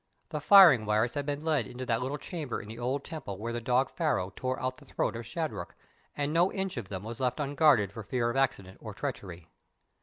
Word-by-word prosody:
The 150 -3 -4
firing 155 - +8
wires 110 +3 +2
had 145 -1 -3
been 145 +1 -3
led 160 -2 +1
into 125 +1 -7
that 115 -1 0
little 135 +4 -2
chamber 150 -4 -5
in 105 - -10
the 110 +2 -8
old 130 +3 -1
temple 150 - -7
where 115 +3 -4
the 120 - -3
dog 125 +2 +1
Pharaoh 100 - -1
tore 130 0 -2
out 130 +1 -3
the 145 - -16
throat 130 - -2
of 115 0 -6
Shadrach, 155 - -4 0.4
and 145 +1 -1
no 175 +3 +3
inch 190 -1 -3
of 120 -7 -5
them 95 -1 -5
was 115 +1 -7
left 130 +2 -1
unguarded 140 - +3
for 110 - -7
fear 120 +2 -1
of - - -6
accident 125 -9 -1
or 110 -3 -8
treachery. 95 - -6
130 Hz, 230 wpm, -29 LUFS, 110-145 Hz, 0.4 s, firing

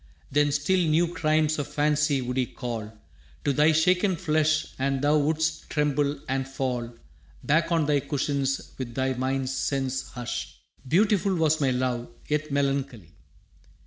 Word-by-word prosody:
Then 145 +1 +3
still 145 +6 +1
new 170 +1 +2
crimes 155 -1 +1
of 145 - -2
fancy 150 -2 +1
would 125 +1 -3
he 130 -2 +1
call 115 -4 -5 0.5
To 140 - +2
thy 150 +3 +4
shaken 180 +4 +3
flesh, 155 -2 +1
and 135 0 0
thou 150 +1 +4
wouldst 160 +2 -1
tremble 145 -1 0
and 135 0 -1
fall 125 -3 -3 0.5
Back 165 +3 +2
on 165 -2 +2
thy 145 -1 +2
cushions 140 -1 -2
with 120 -3 -5
thy 130 0 0
mind's 130 +1 -1
sense 135 0 -2
hushed. 120 -1 -5 0.3
«Beautiful 195 - +3
was 160 -2 +2
my 135 - +3
love, 125 -1 -1 0.2
yet 150 +1 -1
melancholy. 140 - -1
145 Hz, 145 wpm, -26 LUFS, 130-155 Hz, 0.5 s, thy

